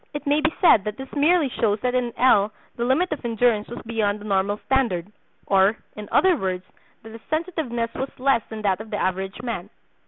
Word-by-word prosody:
It 295 - -5
may 290 +1 +2
be 315 0 +2
said 320 - +6
that 210 0 -4
this 265 0 -9
merely 310 +2 +3
shows 220 -4 0
that 250 0 0
in 250 -1 0
L. 215 -5 +4 0.2
the 235 - -2
limit 315 +9 +1
of 300 - -4
endurance 230 -2 +1
was 240 - -8
beyond 215 -2 -1
the - - -12
normal 200 0 0
standard; 210 -9 0 0.3
or, 195 +2 +3 0.2
in 210 -1 -8
other 375 -2 +4
words, 185 - -3 0.4
that 225 - -11
his 225 0 -11
sensitiveness 310 -8 -2
was 265 +1 -3
less 260 -2 +2
than 220 -1 -7
that 195 0 +1
of 220 - -10
the 210 - -3
average 190 +4 -2
man. 215 -6 -4
230 Hz, 210 wpm, -23 LUFS, 205-265 Hz, 0.4 s, said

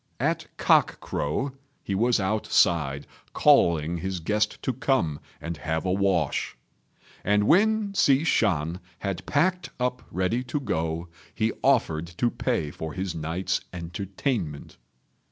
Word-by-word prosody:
At - - 0
cock - - +3
crow 105 - -2 0.3
he 100 - -3
was 115 +4 +2
outside, 85 -8 +2 0.3
calling 85 0 +4
his 95 +1 -3
guest 105 +6 0
to 130 - 0
come 125 - 0 0.2
and 85 -1 -5
have 80 +2 -2
a 90 - +1
wash; 95 -6 0 0.7
and 105 +1 +3
when 210 - +3
Hsi 140 -6 +4
Shan 90 - +1 0.3
had 95 -3 -2
packed 180 +5 +1
up 125 0 -1
ready 95 +8 0
to 140 +4 -2
go, 80 - -2 0.3
he 110 0 +1
offered 80 +1 +2
to 120 +3 +2
pay 75 - -1
for 80 +1 -6
his 95 -1 -3
night's 80 +4 -2
entertainment. 90 - -4
95 Hz, 130 wpm, -26 LUFS, 80-125 Hz, 0.7 s, calling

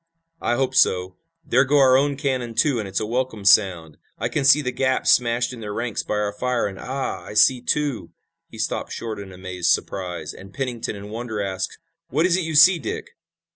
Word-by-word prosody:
"I 120 - +1
hope 130 0 0
so. 90 -6 +2 0.3
There - - +3
go 145 +2 +2
our 130 -2 +6
own 140 +1 +2
cannon, 130 -5 -2
too, 140 -3 +2
and 105 - -4
it's 95 0 -2
a 110 - -2
welcome 115 -2 -3
sound! 90 -6 +3 0.2
I 120 - -2
can 140 +4 -1
see 145 +2 +6
the 125 - -2
gaps 130 0 +1
smashed 120 +1 +2
in 120 - -9
their 105 -2 -6
ranks 115 -2 -2
by - - -3
our 105 -1 -1
fire, 125 +3 -1
and 95 -1 -5
ah, 135 +1 -4
I - - -10
see, 120 +4 +5
too 145 -1 -1 0.2
" - - -60
He - - -12
stopped - - -3
short 110 -3 -5
in 100 -1 -9
amazed 90 -1 -3
surprise, 90 -2 -2
and 95 0 -13
Pennington 125 -5 -3
in 100 +1 -9
wonder 115 -1 -5
asked: 95 -2 -3 0.3
"What 155 +6 +1
is 180 -1 +3
it 185 - 0
you 160 -1 -3
see, 170 +4 +7
Dick?" 120 - -5
120 Hz, 215 wpm, -22 LUFS, 100-135 Hz, 0.3 s, see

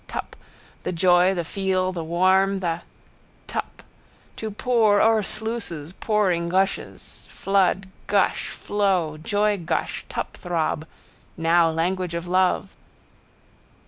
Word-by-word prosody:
Tup. - - -6 0.5
The - - -3
joy 180 +1 +4
the 170 -2 -2
feel 185 0 0
the 170 -3 -4
warm 190 +4 +3
the. 170 -2 -2 0.6
Tup. - - -5 0.5
To 220 - -4
pour 215 -1 +3
o'er 220 0 +4
sluices 200 -8 -4
pouring 190 -6 0
gushes. 190 +2 -2
Flood, 195 -1 +1 0.2
gush, 200 -2 +1
flow, 185 -7 0
joygush, 205 -1 -1
tupthrob. 165 -2 -2 0.5
Now! 165 0 +4
Language 175 +2 -1
of 170 0 -3
love. 185 +1 +1
185 Hz, 105 wpm, -24 LUFS, 170-200 Hz, 0.6 s, joy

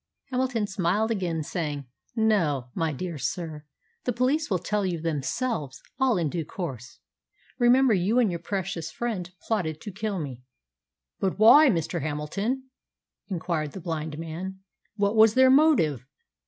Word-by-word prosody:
Hamilton 250 -4 0
smiled 200 +3 0
again, 175 -7 -1
saying, 150 -4 -3 0.3
"No, 165 - +1
my 165 -1 0
dear 165 +2 -5
sir, 150 +3 -4 0.4
the 250 - +1
police 260 +6 +1
will 190 - +2
tell 210 +4 -1
you 180 -3 -1
themselves 150 - -2 0.2
all 260 -5 +3
in 170 -3 +1
due 165 +3 -2
course. 135 - -6 0.6
Remember, 250 0 +5
you 195 +5 +2
and 235 -6 +4
your 170 - -3
precious 180 -2 -3
friend 205 -7 -3
plotted 165 -9 -1
to 205 - -6
kill 205 +1 -3
me." 135 -7 -5 0.8
"But 190 -2 -1
why, 270 +8 +8
Mr. 170 -4 -1
Hamilton?" 160 - -2 0.6
inquired 165 -5 -2
the - - -6
blind 160 -3 -4
man. 175 +4 -6 0.3
"What 205 0 +1
was 220 0 +6
their 260 0 +6
motive?" 260 - +4
185 Hz, 145 wpm, -26 LUFS, 155-220 Hz, 0.8 s, why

